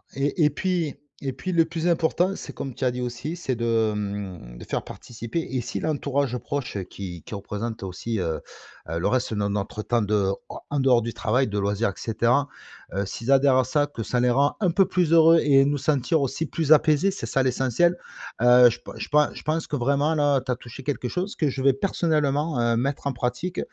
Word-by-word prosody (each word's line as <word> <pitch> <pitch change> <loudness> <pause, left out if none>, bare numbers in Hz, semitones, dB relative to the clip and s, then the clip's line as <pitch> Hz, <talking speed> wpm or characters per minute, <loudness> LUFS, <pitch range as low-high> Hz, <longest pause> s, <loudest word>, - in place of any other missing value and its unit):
Et 145 +3 +1
et - - +5
puis 170 -1 -1 0.3
et 135 -2 -3
puis 185 +8 -5
le 165 -2 +4
plus 165 +1 -3
important 170 +3 +2
c'est - - -8
comme 135 -3 -6
tu 130 - -3
as 125 - +3
dit 125 0 -5
aussi 125 +7 -4
c'est 135 -7 -3
de, 115 -2 +1
hem, 100 -11 -5
de - - -10
faire - - -3
participer 115 +5 -6
et 130 - 0
si 120 - -4
l'entourage 140 -4 -1
proche 140 -5 -4
qui 90 -4 -7
qui 110 - -7
représente 105 +2 -5
aussi, 95 +4 -4
heu 80 -3 -2 0.5
heu, 85 0 -2
le - - 0
reste 130 -3 0
de 105 -1 0
notre 100 +1 -3
temps 120 -1 +1
de 105 -2 +1 0.4
en 145 -1 -1
dehors 125 -3 +4
du 115 +1 -4
travail, 125 +4 +1
de 105 -1 -2
loisirs 100 +2 0
et - - -6
cetera, 120 +5 +1 0.5
heu, 100 0 0
s'ils 115 +6 -3
adhèrent 135 -1 +5
à 130 - +3
ça, 145 +2 +1
que 120 -6 -7
ça 120 +4 -1
les 125 - +3
rend 140 +3 +2
un 180 -3 +3
peu 195 +2 +4
plus 175 -3 +1
heureux 165 0 +7
et 135 -2 +5
nous 145 0 +1
sentir 145 +2 +1
aussi 135 +4 -1
plus 160 -1 -2
apaisés, 155 +5 +5
c'est 195 - -6
ça 135 - +1
l'essentiel, 130 +7 +2 0.5
heu, 125 0 +7
je 115 - -5
p - - -11
je - - -6
pen 150 0 +4
je - - -9
pense 160 +2 -1
que 145 - -3
vraiment, 140 +4 +1
là, 145 -2 +3
tu 130 0 -3
as - - +1
touché 120 +2 -11
quelque 130 -3 -2
chose 185 +3 -3
que 150 -3 +1
je 135 0 -4
vais 135 0 +4
personnellement, 150 -3 0
heu, 115 -1 +2
mettre 135 +3 -2
en 135 - -1
pratique, 125 +10 -3
130 Hz, 225 wpm, -24 LUFS, 115-150 Hz, 0.5 s, heureux